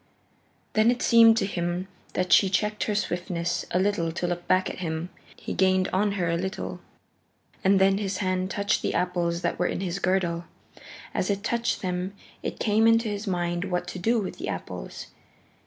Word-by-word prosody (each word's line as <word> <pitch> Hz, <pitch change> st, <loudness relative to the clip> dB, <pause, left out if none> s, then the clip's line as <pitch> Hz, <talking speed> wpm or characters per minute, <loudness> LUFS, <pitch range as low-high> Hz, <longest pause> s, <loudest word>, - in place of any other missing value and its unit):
Then 215 Hz, +2 st, +4 dB
it 245 Hz, 0 st, +1 dB
seemed 230 Hz, -1 st, +7 dB
to 220 Hz, -, +2 dB
him 175 Hz, -1 st, -2 dB, 0.3 s
that 185 Hz, 0 st, +1 dB
she 195 Hz, -, +6 dB
checked 210 Hz, +3 st, 0 dB
her 210 Hz, -, -1 dB
swiftness 175 Hz, -3 st, -2 dB
a -, -, 0 dB
little 185 Hz, -4 st, +1 dB
to 175 Hz, -, -2 dB
look 175 Hz, 0 st, -3 dB
back 185 Hz, 0 st, +3 dB
at -, -, -6 dB
him. 165 Hz, 0 st, -3 dB, 0.3 s
He -, -, -6 dB
gained 185 Hz, 0 st, +3 dB
on 200 Hz, +2 st, +1 dB
her 180 Hz, -4 st, -1 dB
a 170 Hz, 0 st, +1 dB
little. 190 Hz, +3 st, -4 dB, 0.8 s
And 195 Hz, 0 st, +5 dB
then 195 Hz, +1 st, +4 dB
his 195 Hz, -2 st, -2 dB
hand 185 Hz, -1 st, -1 dB
touched 200 Hz, +2 st, 0 dB
the -, -, -1 dB
apples 175 Hz, -1 st, 0 dB
that -, -, -1 dB
were 180 Hz, -, +2 dB
in -, -, -2 dB
his 190 Hz, 0 st, -2 dB
girdle. 175 Hz, -3 st, 0 dB, 0.7 s
As 185 Hz, -, -1 dB
it 200 Hz, 0 st, -1 dB
touched 235 Hz, -1 st, -1 dB
them 180 Hz, +1 st, -2 dB, 0.3 s
it -, -, -4 dB
came 220 Hz, +1 st, +3 dB
into 230 Hz, 0 st, +4 dB
his 205 Hz, +1 st, -4 dB
mind 175 Hz, -1 st, -1 dB
what 180 Hz, -2 st, -2 dB
to 185 Hz, -, -6 dB
do 230 Hz, +6 st, +2 dB
with 200 Hz, -, -5 dB
the -, -, -4 dB
apples. -, -, -6 dB
185 Hz, 190 wpm, -26 LUFS, 175-205 Hz, 0.8 s, seemed